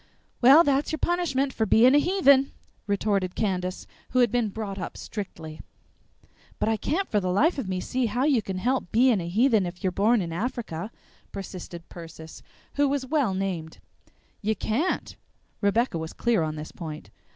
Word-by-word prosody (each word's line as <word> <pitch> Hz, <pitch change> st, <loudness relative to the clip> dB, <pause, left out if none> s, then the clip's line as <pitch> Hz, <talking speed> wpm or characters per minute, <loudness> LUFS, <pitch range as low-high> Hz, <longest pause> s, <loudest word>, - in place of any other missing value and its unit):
"Well, 275 Hz, +7 st, +8 dB
that's 280 Hz, -1 st, +1 dB
your 315 Hz, -, -1 dB
punishment 300 Hz, -6 st, 0 dB
for 220 Hz, -, 0 dB
being 245 Hz, +6 st, +6 dB
a 290 Hz, -, +6 dB
heathen," 280 Hz, -6 st, +4 dB, 0.3 s
retorted 200 Hz, -2 st, 0 dB
Candace, 185 Hz, -3 st, -2 dB, 0.2 s
who 255 Hz, -, -2 dB
had 245 Hz, -4 st, +4 dB
been 240 Hz, -3 st, +1 dB
brought 200 Hz, -1 st, -5 dB
up -, -, -6 dB
strictly. 165 Hz, -7 st, -7 dB, 1.0 s
"But -, -, -1 dB
I 225 Hz, -, +2 dB
can't 355 Hz, -, -1 dB
for 210 Hz, -, +1 dB
the 185 Hz, -2 st, -1 dB
life 290 Hz, -, +2 dB
of 215 Hz, -8 st, -4 dB
me 185 Hz, -1 st, -1 dB
see 255 Hz, +3 st, -1 dB
how 240 Hz, +5 st, -1 dB
you 275 Hz, -5 st, +3 dB
can 190 Hz, -2 st, -5 dB
help 245 Hz, 0 st, -1 dB
being 235 Hz, -3 st, +4 dB
a 170 Hz, -, -5 dB
heathen 220 Hz, -1 st, +3 dB
if 175 Hz, +2 st, -9 dB
you're 185 Hz, -, +1 dB
born 215 Hz, +6 st, +3 dB
in 170 Hz, -4 st, -3 dB
Africa," 210 Hz, -3 st, -4 dB, 0.4 s
persisted 180 Hz, -3 st, -8 dB
Persis, 160 Hz, -2 st, -11 dB, 0.4 s
who 285 Hz, -1 st, +3 dB
was 275 Hz, -1 st, -1 dB
well 260 Hz, -8 st, +1 dB
named. 180 Hz, -5 st, -3 dB, 0.6 s
"You 215 Hz, +1 st, 0 dB
can't." 245 Hz, -, -1 dB, 0.5 s
Rebecca 205 Hz, -2 st, +1 dB
was 160 Hz, 0 st, -6 dB
clear 235 Hz, -6 st, +1 dB
on 155 Hz, -1 st, -2 dB
this 155 Hz, 0 st, -7 dB
point. 155 Hz, -3 st, -8 dB
215 Hz, 175 wpm, -26 LUFS, 185-260 Hz, 1.0 s, Well